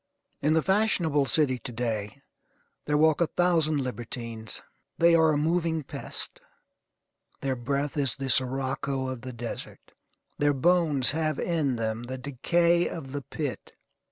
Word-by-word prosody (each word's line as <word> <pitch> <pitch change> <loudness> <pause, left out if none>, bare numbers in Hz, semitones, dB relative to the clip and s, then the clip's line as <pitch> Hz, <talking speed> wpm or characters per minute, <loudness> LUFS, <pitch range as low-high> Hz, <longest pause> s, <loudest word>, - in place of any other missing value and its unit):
In 150 +2 +3
the 160 -1 +3
fashionable 180 -8 +2
city 130 0 +2
to 125 - -7
day 115 +2 -3 0.6
there 150 0 +2
walk 155 +1 +4
a 170 - +4
thousand 160 -5 +2
libertines. 115 -2 -5 0.3
They 170 0 +5
are 160 -1 +5
a 150 - +1
moving 160 0 +1
pest. - - -3 1.0
Their 135 -1 0
breath 140 +3 -2
is 140 -4 +1
the 135 -1 -2
sirocco 130 +1 0
of 130 -2 -5
the 130 0 -6
desert. 120 -1 -7 0.5
Their 145 0 +3
bones 150 -2 +3
have 155 -1 0
in 155 -7 0
them 110 0 -2
the 130 +2 -5
decay 170 +6 +2
of 135 -6 -7
the 145 +1 -3
pit. 125 - -5
140 Hz, 145 wpm, -27 LUFS, 130-160 Hz, 1.0 s, They